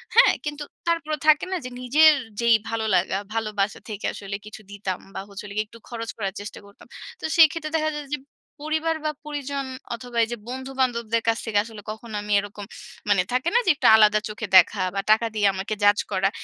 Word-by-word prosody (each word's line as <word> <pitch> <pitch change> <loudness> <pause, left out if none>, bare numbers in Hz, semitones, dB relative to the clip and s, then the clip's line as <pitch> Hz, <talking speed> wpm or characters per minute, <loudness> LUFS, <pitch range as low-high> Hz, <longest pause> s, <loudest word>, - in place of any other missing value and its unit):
হ্যাঁ? 480 - +7
কিন্তু 295 0 -4 0.2
তারপরেও 310 -2 0
থাকে 305 +2 +5
না 375 - 0
যে - - -4
নিজের 305 +5 +6 0.3
যেই 235 -1 +5
ভালো 225 -1 -2
লাগা, 185 +1 +1 0.2
ভালোবাসা 215 -2 -1
থেকে 210 -1 -5
আসলে 200 0 -6
কিছু 215 0 -10
দিতাম 195 -2 -4
বা - - -5
হচ্ছে 200 0 -9
হলো 200 - -8
গিয়ে 215 - +1
একটু 230 +2 -15
খরচ 230 -2 -5
করার 195 -3 -3
চেষ্টা 205 0 -8
করতাম। 200 0 -17 0.3
তো - - -19
সেই 325 -2 +9
ক্ষেত্রে 310 -2 -5
দেখা 310 0 0
যায় 295 - -7
যে - - -10 0.4
পরিবার 315 +1 0
বা 305 - +1
পরিজন 285 -2 -4 0.3
অথবা 245 0 -8
এইযে 240 +1 -5
বন্ধু-বান্ধবদের 255 -3 -1
কাছ 225 - +2
থেকে 210 -2 +2
আসলে 220 -2 -10
কখনো 220 0 -8
আমি 210 0 -2
এরকম 205 0 -7 0.4
মানে 200 -3 +4
থাকে 255 +7 +1
না 485 - +7
যে 360 - +6
একটু 260 -3 +2
আলাদা 215 -1 +5
চোখে 210 0 -5
দেখা 185 - +5
বা 195 - 0
টাকা 220 +2 +4
দিয়ে 205 -1 +3
আমাকে 190 +3 -3
judge 205 0 +5
করা, 195 +1 +2
230 Hz, 205 wpm, -24 LUFS, 205-290 Hz, 0.4 s, সেই